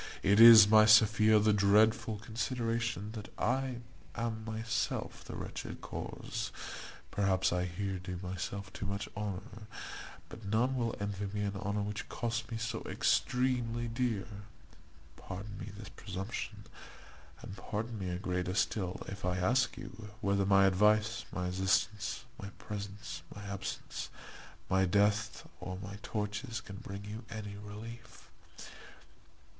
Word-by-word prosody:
It 100 +2 +5
is, 115 -2 +12
my 110 0 +7
Sophia, 110 0 +7
the 105 0 +4
dreadful 105 +2 +4
consideration 115 -1 -2
that 110 -2 -8
I 130 -2 0 0.3
am 115 -1 -2
myself 115 +1 -2
the - - -8
wretched - - -6
cause. - - -5 0.6
Perhaps 95 -3 +2
I 90 0 +1
here 95 +1 -3
do 90 -1 -5
myself 95 +1 -4
too 105 - -4
much 100 +1 -3
honour, 105 +2 -5 0.6
but 115 - -11
none 115 +6 +1
will 120 -3 0
envy 100 0 -2
me 105 - 0
an 100 0 -2
honour 100 +1 -1
which 105 0 -4
costs 115 -1 -2
me 115 - -3
so 115 +1 -3
extremely 120 -2 +1
dear. 115 -3 -1 0.9
Pardon 100 +3 -7
me - - -6
this 105 -2 -8
presumption, 100 +2 -5 0.8
and 95 - -7
pardon 110 +3 -4
me 95 -2 -3
a 90 - -2
greater 90 -1 -2
still, 95 -4 0
if 100 +1 -7
I 90 0 0
ask 125 +8 +2
you, 110 -2 -8
whether 100 -2 +1
my 100 -1 +6
advice, 105 +4 +3
my 90 - -2
assistance, 95 +5 0 0.2
my 100 - -6
presence, 100 -3 -6
my 105 - -8
absence, 100 -2 -5 0.6
my 95 +1 +3
death, 105 +3 +2
or 90 0 -5
my 100 +2 -7
tortures 110 +3 -3
can 100 -3 -9
bring 100 -2 -7
you 110 +3 -6
any 105 -2 -6
relief? 110 +3 -10
105 Hz, 140 wpm, -33 LUFS, 100-115 Hz, 0.9 s, is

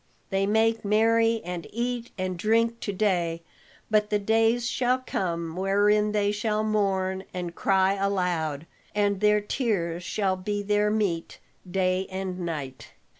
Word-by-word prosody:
They 195 0 +1
make 225 +2 +2
merry 225 +2 +3
and 175 -1 -5
eat 240 +1 -2
and 185 -1 -2
drink 230 +5 +1
to 205 - -3
day, 175 -5 0 0.5
but 210 -1 +3
the 210 - +2
days 225 +3 +2
shall 250 +1 +1
come 170 -9 -3
wherein 205 +3 +2
they 205 -1 +1
shall 210 +1 -1
mourn 190 -3 0
and 175 -2 -4
cry 190 +1 +2
aloud, 180 -6 -1 0.3
and 205 -1 +1
their 210 0 +4
tears 195 -7 -1
shall 190 0 0
be 205 +2 -3
their 210 +1 +2
meat 200 -6 -1 0.3
day 185 0 0
and 190 -1 -4
night." 140 -9 -5
200 Hz, 140 wpm, -26 LUFS, 185-215 Hz, 0.5 s, their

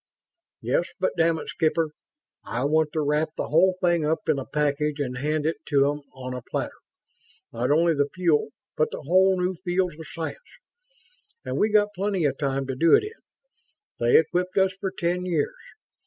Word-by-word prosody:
"Yes, - - +1
but - - +1
damn 165 -1 +2
it, - - -7
Skipper, 160 0 0 0.5
I 120 +3 -3
want 155 +1 +2
to 155 - 0
wrap 150 +2 0
the - - -3
whole 180 +4 +4
thing 175 -2 +3
up 160 +2 -1
in 155 -3 +2
a 135 - -7
package 150 +1 0
and 125 -3 -3
hand 150 +2 -1
it 160 - 0
to 140 -2 +3
'em 145 0 -6
on 130 -1 -7
a 125 - -5
platter. - - -4 0.7
Not 120 +2 -1
only 165 +3 +4
the 145 -1 0
fuel, 170 -6 +1 0.3
but 155 - +1
whole 185 +5 +2
new 180 +1 0
fields 180 -1 0
of 160 - -9
science. 165 -1 -5 1.1
And - - -2
we've 210 0 +2
got 205 -1 +3
plenty 195 -3 -1
of 135 -2 0
time 135 -2 -1
to 135 -1 -4
do 165 +5 +5
it - - +3
in. 430 +2 -9 0.8
They 120 0 +5
equipped 180 +4 0
us 190 0 +3
for 195 0 -4
ten 180 0 -2
years. 165 -5 0
160 Hz, 185 wpm, -25 LUFS, 145-180 Hz, 1.1 s, do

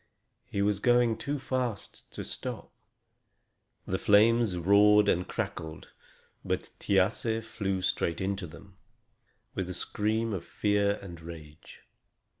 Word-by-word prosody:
He 100 - -1
was 100 -1 +1
going 120 0 +3
too 145 +1 -3
fast 125 -6 -4
to - - -7
stop. - - -6 1.1
The - - -2
flames 110 -1 +4
roared 105 +3 +5
and 90 -2 +2
crackled, 80 -1 -5 0.5
but - - -3
Thiasse 110 +3 +1
flew 95 -4 -2
straight 85 -2 0
into 95 -1 -2
them, 95 +4 -14 0.8
with 95 -1 -3
a 90 - -4
scream 110 +2 -1
of 90 -4 -3
fear 100 +1 +1
and 85 -4 -9
rage. 80 -2 -11
100 Hz, 120 wpm, -29 LUFS, 90-110 Hz, 1.1 s, roared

